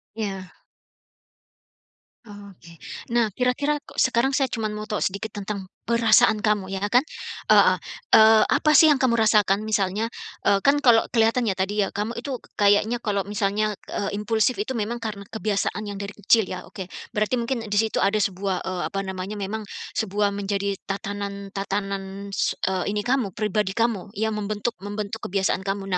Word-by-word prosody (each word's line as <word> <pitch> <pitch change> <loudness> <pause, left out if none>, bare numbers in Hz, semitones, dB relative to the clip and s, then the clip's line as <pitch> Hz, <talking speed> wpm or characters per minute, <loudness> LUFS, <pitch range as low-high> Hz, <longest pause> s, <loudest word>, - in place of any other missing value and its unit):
Iya. 195 -4 -4 1.8
Oke. 200 -6 -13 0.3
Nah, 235 -2 +3
kira-kira 255 +4 +1
kok - - -4
sekarang 260 +1 +2
saya 270 -1 +2
cuman 220 -3 -3
mau 215 0 -6
tahu 210 - -1
sedikit 200 +3 -2
tentang 200 -2 -5 0.2
perasaan 225 -2 +4
kamu, 205 -3 0
ya 195 - -3
kan, 250 +6 +4 0.5
heeh. - - +6 0.4
Eee, 220 0 +7
apa 305 - +3
sih 315 +2 +8
yang 295 - +5
kamu 235 -3 +2
rasakan? 210 -2 +3
Misalnya, 215 0 0 0.4
eee, 200 - +5
kan 290 +1 +4
kalau 235 -5 +5
kelihatan 230 +1 +3
ya 205 - +1
tadi 195 +2 0
ya, - - -5
kamu 215 +4 -3
itu 255 +1 -4
ka 205 - -4
kayaknya 205 +4 +4
kalau 200 -2 0
misalnya, 205 0 0 0.2
eee, 205 0 -2
impulsif 220 +3 +1
itu 215 +6 -2
memang 230 0 -2
karena 210 -4 -6
kebiasaan 215 -1 -2
yang 200 -1 -6
dari 200 0 -6
kecil, 215 -1 +3
ya? 185 - -6
Oke. 190 -2 -8 0.2
Berarti 215 +4 0
mungkin 235 -2 -2
di 205 - -1
situ 220 +1 +2
ada 200 +2 +2
sebuah, 195 -2 -1
eee, 185 -1 -3
apa 195 0 -3
namanya, 190 +2 -5
memang, 205 +2 -3 0.3
sebuah 205 -1 0
menjadi 200 0 -2 0.2
tatanan-tatanan, 200 0 -4 0.3
eee 185 -1 0
ini 210 0 -2
kamu, 245 -7 0
pribadi 210 -2 -1
kamu 225 -4 0
yang 220 +1 0
membentuk 210 +2 -2
membentuk 205 +1 -5
kebiasaan 190 0 0
kamu. 195 0 -3
210 Hz, 165 wpm, -24 LUFS, 200-225 Hz, 1.8 s, sih